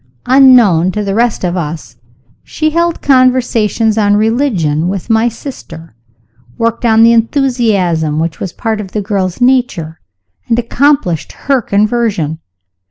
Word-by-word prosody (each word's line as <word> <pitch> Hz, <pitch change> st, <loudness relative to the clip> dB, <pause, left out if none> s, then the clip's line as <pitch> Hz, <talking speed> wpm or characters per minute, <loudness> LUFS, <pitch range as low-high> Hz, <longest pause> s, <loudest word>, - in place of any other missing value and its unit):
Unknown 245 Hz, -10 st, +4 dB
to 210 Hz, -, -2 dB
the 195 Hz, -1 st, -3 dB
rest 235 Hz, 0 st, 0 dB
of 180 Hz, 0 st, -1 dB
us, 155 Hz, -6 st, -6 dB, 0.5 s
she 310 Hz, 0 st, -2 dB
held 340 Hz, +1 st, -1 dB
conversations 245 Hz, -5 st, +1 dB
on 205 Hz, -1 st, +2 dB
religion 210 Hz, -, 0 dB
with 195 Hz, +4 st, -4 dB
my 225 Hz, +2 st, +2 dB
sister 165 Hz, -, -11 dB, 0.6 s
worked 230 Hz, +1 st, -2 dB
on 225 Hz, -1 st, +4 dB
the 230 Hz, 0 st, +5 dB
enthusiasm 220 Hz, -, 0 dB
which 160 Hz, 0 st, -3 dB
was 190 Hz, -, -5 dB
part 220 Hz, +1 st, -3 dB
of 190 Hz, -3 st, -10 dB
the 210 Hz, -, -2 dB
girl's 190 Hz, -2 st, -2 dB
nature 245 Hz, -11 st, 0 dB, 0.5 s
and 230 Hz, -, +1 dB
accomplished 240 Hz, -, 0 dB
her 270 Hz, -2 st, -1 dB
conversion. 205 Hz, -7 st, -1 dB
220 Hz, 135 wpm, -12 LUFS, 180-245 Hz, 0.6 s, the